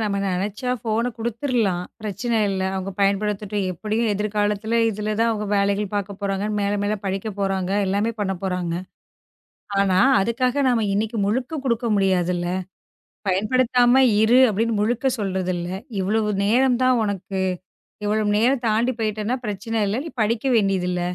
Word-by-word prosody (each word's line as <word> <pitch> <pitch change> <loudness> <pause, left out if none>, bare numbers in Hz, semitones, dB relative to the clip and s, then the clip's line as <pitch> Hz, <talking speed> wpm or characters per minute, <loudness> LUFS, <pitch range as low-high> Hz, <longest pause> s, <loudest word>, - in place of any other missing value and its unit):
நாம 205 -2 -1
நெனைச்சா 200 +6 -2
ஃபோன் 225 +2 0
குடுத்துடலாம். 230 -5 -1 0.2
பிரச்சனை 215 +3 -2
இல்ல, 195 -1 -2
அவங்க 190 +1 -3
பயன்படுத்தட்டும். 200 0 0
எப்படியும் 215 +5 -1
எதிர் 210 +1 -3
காலத்துல 210 +2 +1
இதுல 210 +1 -3
தான், 230 0 +3
அவங்க 210 -2 -2
வேலைகள் 200 0 +1
பாக்கப் 200 0 -3
போறாங்க. 200 0 -1
மேல, 200 0 0
மேல 205 +1 0
படிக்கப் 195 +2 -3
போறாங்க. 195 -2 -1 0.2
எல்லாமே 200 +4 +1
பண்ண 190 -2 0
போறாங்க. 180 -3 -2 1.1
ஆனா, 190 -2 +3 0.2
அதுக்காக 250 +5 0
நாம 235 -3 +2
இன்னைக்கு 220 +3 -1
முழுக்க 255 +9 -1
குடுக்க 235 -1 0
முடியாதுல்ல. 180 -3 +1 0.8
பயன்படுத்தாம 245 +6 +3 0.2
இரு 235 +3 +5
அப்படின்னு 225 +3 0
முழுக்க 240 +4 0
சொல்றது 190 -2 -1
இல்ல. 175 0 -4 0.3
இவ்வளவு 210 +3 0 0.2
நேரம் 245 +3 +3
தான் 255 0 +4
உனக்கு. 195 -2 -3 0.6
இவ்வளவு 210 0 +1
நேரம் 250 +3 +2
தாண்டிப் 230 +3 +1
போயிட்டேன்னா 215 +2 -1
பிரச்சனை 210 +2 -3
இல்ல. 205 - -1
நீ 330 - -5
படிக்க 225 +3 0
வேண்டியது 195 -4 +2
இல்ல. 180 0 -1
210 Hz, 145 wpm, -22 LUFS, 195-230 Hz, 1.1 s, இரு